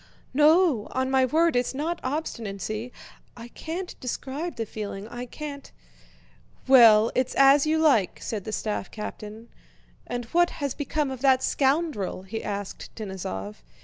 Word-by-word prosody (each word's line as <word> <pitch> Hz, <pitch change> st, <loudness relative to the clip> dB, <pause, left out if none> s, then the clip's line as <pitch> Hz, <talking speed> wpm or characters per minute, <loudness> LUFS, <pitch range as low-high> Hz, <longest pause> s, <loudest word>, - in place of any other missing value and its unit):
"No, 300 Hz, -, +4 dB
on 260 Hz, 0 st, 0 dB
my 265 Hz, -1 st, +4 dB
word 320 Hz, +4 st, +2 dB
it's 245 Hz, +1 st, 0 dB
not 330 Hz, +5 st, -2 dB
obstinacy! 230 Hz, -, -4 dB, 0.5 s
I 235 Hz, 0 st, -9 dB
can't 345 Hz, +8 st, -6 dB
describe 275 Hz, +6 st, -4 dB
the 230 Hz, -, -3 dB
feeling. 205 Hz, -1 st, -6 dB
I 240 Hz, +2 st, -7 dB
can't..." 285 Hz, +1 st, -8 dB, 1.0 s
"Well, 230 Hz, -4 st, +7 dB
it's 255 Hz, 0 st, 0 dB
as 275 Hz, +2 st, +6 dB
you 315 Hz, +1 st, +2 dB
like," 275 Hz, -, +3 dB
said 210 Hz, -4 st, -4 dB
the 220 Hz, -, -6 dB
staff 210 Hz, -2 st, -3 dB
captain. 215 Hz, +1 st, -8 dB, 0.6 s
"And 245 Hz, -1 st, -4 dB
what 345 Hz, 0 st, +4 dB
has 280 Hz, -3 st, -2 dB
become 290 Hz, -1 st, -2 dB
of 260 Hz, -2 st, -7 dB
that 265 Hz, -2 st, +4 dB
scoundrel?" 270 Hz, -, 0 dB
he 220 Hz, +4 st, -6 dB
asked 200 Hz, -1 st, -5 dB
Denísov. 140 Hz, -, -6 dB
255 Hz, 145 wpm, -26 LUFS, 215-295 Hz, 1.0 s, Well